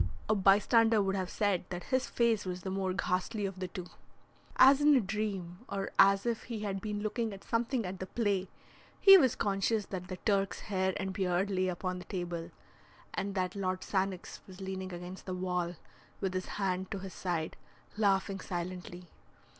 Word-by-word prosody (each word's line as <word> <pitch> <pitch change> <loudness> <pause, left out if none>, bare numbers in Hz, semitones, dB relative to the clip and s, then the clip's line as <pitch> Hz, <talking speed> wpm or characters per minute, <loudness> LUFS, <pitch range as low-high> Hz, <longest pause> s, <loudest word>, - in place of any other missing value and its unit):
A 215 - +3
bystander 215 +3 +5
would 195 -1 +1
have 185 -2 -2
said 200 -4 0
that 175 -1 -5
his 260 0 +2
face 230 -3 +2
was 180 -1 -4
the 190 - -3
more 190 -1 -1
ghastly 185 +3 -1
of 190 -1 -5
the 185 - -2
two. 180 0 -7 0.7
As 270 +2 +7
in 295 0 +6
a - - +6
dream, 195 -4 -3
or 195 -1 -3
as 195 +1 +6
if 235 -2 -1
he 230 -3 -5
had 195 -2 -3
been 210 -1 -3
looking 220 0 -1
at 195 - -10
something 230 0 0
at 180 +1 -5
the 185 - -5
play, 200 -4 0 0.5
he 390 -1 +10
was 260 -7 +3
conscious 200 +2 0
that 180 -2 -6
the 185 0 -5
Turk's 195 -2 +1
hair 190 -2 0
and 190 -1 -3
beard 185 +1 0
lay 185 -1 +1
upon 180 0 -3
the 180 - -10
table, 175 -3 -4 0.6
and 200 0 -3
that 185 0 -1
Lord 185 -2 -1
Sannox 190 -2 -2
was 185 -1 -12
leaning 190 -1 -5
against 180 +2 -8
the 185 - -2
wall 180 -1 -1 0.4
with 190 -2 -1
his 185 0 -2
hand 190 -2 -1
to 200 - -3
his 190 -1 -7
side, 170 -3 -2 0.4
laughing 195 -2 +1
silently. 180 0 -5
190 Hz, 185 wpm, -32 LUFS, 185-205 Hz, 0.7 s, he